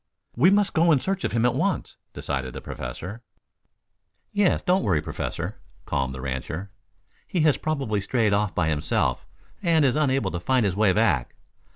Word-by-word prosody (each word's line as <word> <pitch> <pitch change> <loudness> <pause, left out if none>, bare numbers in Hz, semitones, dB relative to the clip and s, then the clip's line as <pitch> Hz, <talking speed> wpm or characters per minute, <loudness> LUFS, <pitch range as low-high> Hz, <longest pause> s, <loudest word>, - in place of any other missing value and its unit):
"We 145 +10 +5
must 205 0 +3
go 165 +1 +4
in 145 - +5
search 195 +5 -2
of - - -1
him 115 0 +1
at 125 - +3
once," 185 +8 -1
decided 65 -2 -4
the - - -6
Professor. 90 - -7 1.1
"Yes, 205 -3 +2
don't 185 +2 +3
worry, 90 -7 +2
Professor," - - -5 0.3
calmed 65 -1 -1
the 65 - -7
rancher. 70 +8 -4 0.6
"He 175 - 0
has 150 -2 +4
probably 135 -10 -1
strayed 110 0 +1
off 105 -1 0
by 85 -3 +1
himself 75 0 0 0.3
and 165 -5 +3
is 130 - +2
unable 135 -9 +1
to 85 - -3
find 125 +5 +2
his 95 -3 0
way 105 -1 +4
back. 100 - +1
110 Hz, 175 wpm, -25 LUFS, -, 1.1 s, We